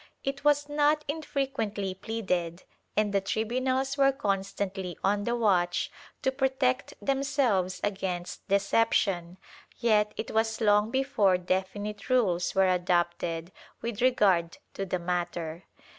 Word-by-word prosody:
It 275 +1 -3
was 290 0 +3
not 295 +1 +2
infrequently 270 -10 -2
pleaded, 185 -4 -3 0.3
and 210 -1 +2
the 195 - +3
tribunals 255 +7 -1
were 275 0 +6
constantly 195 -5 -2
on 205 +1 +1
the 235 - 0
watch 185 -6 +1 0.3
to 265 - +2
protect 265 -1 0
themselves 270 -10 +1
against 190 -3 -3
deception, 195 -3 +1 0.4
yet 210 -3 +3
it - - -4
was 220 0 +1
long 210 -1 +4
before 235 -8 +2
definite 190 +4 -3
rules 195 -9 +2
were 190 0 +4
adopted 175 -1 0 0.3
with 230 -2 -3
regard 195 -9 +3 0.2
to 195 - -4
the 185 - 0
matter. 175 -1 -3
205 Hz, 120 wpm, -28 LUFS, 185-255 Hz, 0.4 s, were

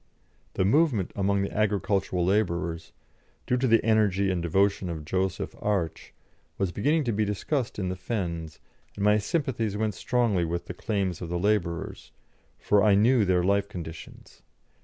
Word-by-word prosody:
The 95 - +1
movement 130 - +2
among 100 0 +1
the 100 - -5
agricultural 100 -4 0
labourers, 85 -4 -1 0.5
due 125 - +1
to 130 +1 +1
the 115 -2 +3
energy 100 -3 +2
and 90 -2 -1
devotion 95 +2 +1
of 80 -3 -5
Joseph 95 +2 -2
Arch, 100 -6 -2 0.5
was 95 -2 -1
beginning 150 - +1
to 120 - -1
be 110 0 +1
discussed 110 +5 -2
in 95 -3 -2
the 90 - -3
fens, 85 -6 -4 0.4
and 100 - -2
my 105 +1 +5
sympathies 115 - -1
went 110 -1 0
strongly 115 -4 +1
with 85 +1 -3
the - - -6
claims 100 -6 -2
of 85 - -5
the 90 - -1
labourers, 95 -1 -1 0.5
for 105 -1 +2
I 105 -2 +5
knew 115 +2 +4
their 90 -1 +2
life 100 +1 +1
conditions. 80 -4 -10
100 Hz, 160 wpm, -27 LUFS, 90-110 Hz, 0.5 s, my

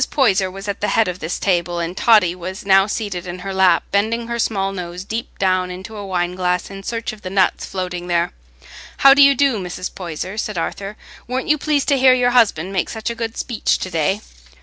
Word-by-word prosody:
Poyser 195 -9 +2
was 195 +2 -9
at 200 - -4
the 210 - +1
head 225 - +2
of 180 0 -4
this 160 +3 -3
table, 175 -2 0
and 170 +1 -3
Totty 210 -6 +4
was 185 +2 -7
now 195 0 +5
seated 200 -5 -4
in 175 +1 -5
her 195 - -3
lap, 190 -3 +4
bending 220 +4 0
her 235 0 -4
small 195 -4 0
nose 180 -1 -6
deep 225 +4 -5
down 185 -1 +1
into 190 +4 -8
a 205 - -6
wine 180 -2 -1
glass 180 0 -1
in 195 0 -8
search 230 +2 -4
of 215 - -13
the 185 - -6
nuts 190 0 +1
floating 180 -2 -4
there. 170 -1 +1 0.7
"How 275 - +11
do 285 - +4
you 280 0 +7
do, 275 -3 +2
Mrs. 180 0 -5
Poyser?" 185 +3 -5
said 210 -3 -3
Arthur. 195 +5 -4 0.3
"Weren't 255 +4 -3
you 305 0 +3
pleased 295 -2 0
to 280 -2 +3
hear 260 0 +6
your 245 -1 +2
husband 195 -7 +2
make 185 - 0
such 220 +1 -4
a - - -5
good 225 0 -4
speech 240 -4 0
to 185 - -5
day?" 185 +5 0
195 Hz, 225 wpm, -19 LUFS, 180-225 Hz, 0.7 s, How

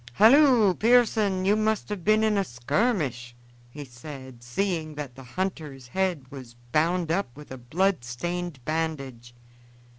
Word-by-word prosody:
"Halloo, 235 - +6
Pearson! 215 -4 +3
you 200 +2 +4
must 215 0 0
have 205 -4 -5
been 215 +2 +3
in 215 -1 +2
a 200 - +2
skirmish," 130 - -1 0.3
he 145 +3 -9
said, 130 -1 -11
seeing 155 +4 -2
that 145 -4 -6
the 135 - -12
hunter's 140 -3 -5
head 180 -4 -1
was 130 -4 -10 0.2
bound 165 +3 +1
up 175 -5 0
with 150 -2 -12
a 130 - -6
bloodstained 170 0 -2
bandage. 140 -7 -4
160 Hz, 140 wpm, -26 LUFS, 130-195 Hz, 0.3 s, Halloo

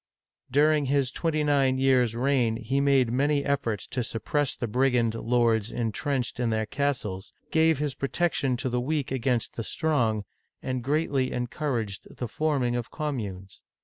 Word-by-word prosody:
During 150 +1 +3
his 135 -1 +1
twenty 155 -2 0
nine 135 -3 +3
years' 130 -4 +3
reign 125 -2 +2
he 135 +4 -1
made 135 -4 +3
many 140 +3 +1
efforts 120 -8 -1
to 125 - -2
suppress 130 +5 -1
the - - -3
brigand 125 -1 +2
lords 115 -2 +1
intrenched 120 +3 -2
in 120 -2 +1
their 110 -1 0
castles, 110 -7 -2 0.2
gave 160 -1 +4
his 145 -1 -1
pro 135 - -3
tection 140 -7 +1
to 130 - -2
the 125 0 0
weak 145 +1 -1
against 125 -2 -1
the 115 - -2
strong, 115 -6 0 0.4
and 130 -2 -2
greatly 140 -2 0
en 125 - -1
couraged 120 -7 -4
the 125 - -3
forming 135 -3 0
of 120 -1 -3
communes. 105 - -5
130 Hz, 160 wpm, -27 LUFS, 115-145 Hz, 0.4 s, gave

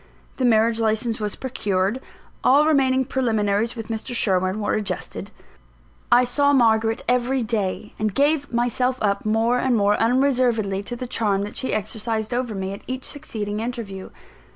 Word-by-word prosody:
The 260 - 0
marriage 225 0 +3
license 225 +1 0
was 210 -1 -3
procured; 205 -3 -1 0.4
all 285 +4 +5
remaining 265 -4 +3
preliminaries 225 -3 0
with 225 -1 -7
Mr. 225 +2 -4
Sherwin 190 -2 +1
were 205 - -1
adjusted; 200 -4 -4 0.8
I 245 - +6
saw 285 +3 +2
Margaret 225 -3 +3
every 250 +1 +1
day, 210 -2 -2
and 215 0 0
gave 285 +5 +1
myself 245 +2 0
up 200 0 0
more 225 +3 +2
and 250 -2 +2
more 205 0 +3
unreservedly 240 -5 +2
to 240 - -5
the 250 - -5
charm 205 -5 0
that 210 - -7
she 260 - -2
exercised 220 +1 -2
over 245 -3 -2
me, 190 0 -3
at 200 - -9
each 255 0 -4
succeeding 215 -8 -4
interview. 225 -5 -5
225 Hz, 155 wpm, -23 LUFS, 210-250 Hz, 0.8 s, I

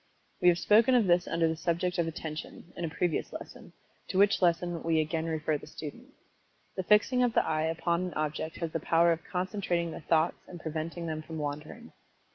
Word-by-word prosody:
We 180 - +4
have 175 -1 +6
spoken 225 +7 +5
of 235 -4 +4
this 175 -1 +3
under 165 0 +1
the 160 - 0
subject 175 +2 -1
of 170 - +1
Attention, 160 +1 -7
in 175 - -5
a - - -3
previous 170 +1 -1
lesson, - - -9 0.4
to - - -3
which 200 0 +4
lesson 175 -1 +1
we 165 -1 +1
again 160 +1 -1
refer 155 -2 -1
the - - -12
student. 200 - -8 0.7
The 190 - -1
fixing 210 +6 +3
of 245 -2 +2
the - - +4
eye 155 -1 0
upon 170 +2 0
an 180 - -7
object 155 +1 -2
has 165 -2 -4
the 165 - -2
power 170 +2 +3
of 165 0 -2
concentrating 180 -2 -2
the - - -7
thoughts 160 +1 +1
and 175 - -9
preventing 160 +2 -4
them 155 -1 -3
from 160 +1 -8
wandering. 150 +10 -6
170 Hz, 205 wpm, -30 LUFS, 160-180 Hz, 0.7 s, have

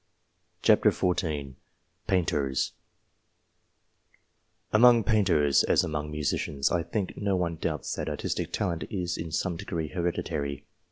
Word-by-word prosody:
PAINTERS - - +4
239 75 -7 -1 0.5
PAINTERS 75 -8 +1 2.0
AMONG 120 +1 +7
painters, 90 - +3
as - - +3
among 75 -1 -3
musicians, 75 -2 -1
I 85 - +2
think 90 +3 -3
no 100 -2 0
one 85 -2 -1
doubts 80 -3 -3
that - - -3
artistic - - -3
talent 85 -5 -2
is, 90 -5 -2
in 80 -1 -5
some 85 +3 -1
degree, 80 -2 -4
hereditary. 75 -5 -3
85 Hz, 115 wpm, -28 LUFS, 75-90 Hz, 2.0 s, AMONG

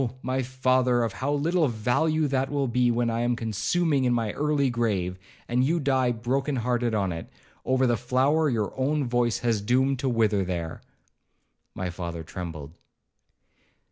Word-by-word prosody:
my 130 +1 0
father, 130 -1 +2
of 115 - -2
how 140 +2 -2
little 155 +3 +2
value 130 +8 +1
will - - +2
that 135 -1 -1
be, 125 0 +3
when 120 0 +1
I 115 +1 -1
am 120 0 +1
consuming 135 - 0
in 125 - +2
my 115 -3 -1
early 145 -1 +1
grave, 100 -6 -1 0.3
and 125 +1 +1
you 165 +6 +1
die 130 -4 +2
broken 130 +5 -1
hearted 120 -1 0
on 100 -3 0
it, 80 0 -6 0.4
over 130 +1 +2
the 120 -2 +2
flower 135 +6 +2
your 110 -5 -1
own 145 +3 0
voice 120 -1 +1
has 115 -3 +1
doomed 130 +4 +1
to 135 - 0
wither 110 -4 +2
there.' 85 -3 -4 0.9
My 95 -1 -3
father 85 -2 -5
trembled. 80 -3 -7
120 Hz, 165 wpm, -26 LUFS, 110-135 Hz, 0.9 s, be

